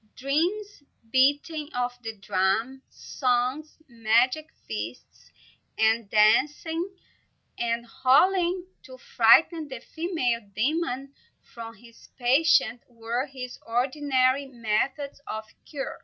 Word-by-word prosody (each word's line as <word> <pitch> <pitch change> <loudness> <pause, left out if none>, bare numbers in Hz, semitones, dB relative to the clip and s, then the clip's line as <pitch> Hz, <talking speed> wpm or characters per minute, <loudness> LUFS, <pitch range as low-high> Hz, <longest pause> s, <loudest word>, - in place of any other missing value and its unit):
Dreams, 345 +9 -1 0.3
beating 290 +4 +2
of 245 0 -1
the 225 -2 -7
drum, 200 +7 0
songs, 255 +4 -2
magic 240 +5 +1 0.2
feasts 110 +2 -7 0.5
and 220 -1 +2
dances, 290 - +3 0.7
and 235 0 -1 0.2
howling 360 +6 +3 0.2
to - - -12
frighten 360 -9 +4
the 260 -3 -7
female 285 -5 -2
demon 275 +1 -1 0.4
from 230 -1 -8
his 230 +2 -18
patient, 250 -2 +3
were 235 +3 -3
his 255 -2 -8
ordinary 260 +2 +1
methods 260 +4 -2
of 220 0 -5 0.2
cure. 280 -3 -5
255 Hz, 95 wpm, -26 LUFS, 230-300 Hz, 0.7 s, frighten